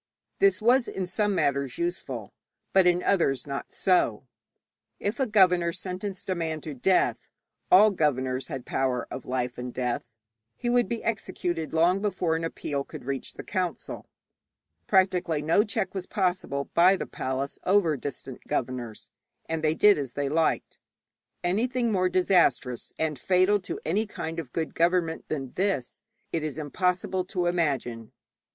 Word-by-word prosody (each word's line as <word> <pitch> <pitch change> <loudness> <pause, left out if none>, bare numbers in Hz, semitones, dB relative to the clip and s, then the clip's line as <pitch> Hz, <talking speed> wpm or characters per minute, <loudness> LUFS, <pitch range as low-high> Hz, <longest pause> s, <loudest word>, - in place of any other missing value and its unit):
This 390 - +3
was 245 +2 +4
in 190 - -3
some 205 +2 0
matters 140 -4 0
useful, 345 +1 -4 0.4
but 190 -2 +5
in 180 0 +3
others 135 -10 +2
not 140 -1 -5
so. 135 - +2 0.7
If 205 +6 -2
a 265 - +2
governor 180 -5 +4
sentenced 185 +2 -5
a 190 - +1
man 160 -3 -2
to 155 - -6
death 180 +8 +2 0.5
all 210 +3 +7
governors 130 -6 0
had 130 -2 -6
power 130 -2 0
of 130 - -7
life 125 -1 -2
and 125 0 -4
death 125 -1 -1 0.5
he 240 - -2
would 245 -1 +3
be 235 -2 -3
executed 175 -7 -2
long 175 +4 +3
before 180 -5 0
an 165 - -2
appeal 145 -3 -3
could - - -10
reach 135 0 -4
the - - -7
council. 180 -5 -3 0.8
Practically 180 -5 +2
no 165 +7 +4
check 195 -3 -2
was 190 -2 -4
possible 180 -8 -1
by 180 +3 +6
the - - -4
palace 130 +1 -4
over 185 -5 +3
distant 135 -1 -7
governors, 125 -5 -3 0.4
and 160 -1 -2
they 155 0 +2
did 205 -1 +6
as 135 -4 -4
they 140 -1 -1
liked. 160 +2 0 0.6
Anything 235 +6 +1
more 185 -2 +2
disastrous 180 -9 +2
and 155 -4 -1
fatal 185 +5 +3
to 185 - -5
any 205 +7 +1
kind 165 -5 -5
of 140 -6 -7
good 160 +2 -3
government 170 -1 +1
than 135 -4 -4
this 185 -10 -1 0.3
it 165 - 0
is 155 -2 -4
impossible 180 +4 0
to 180 -3 -2
imagine. 135 -10 -1
170 Hz, 155 wpm, -27 LUFS, 140-190 Hz, 0.8 s, all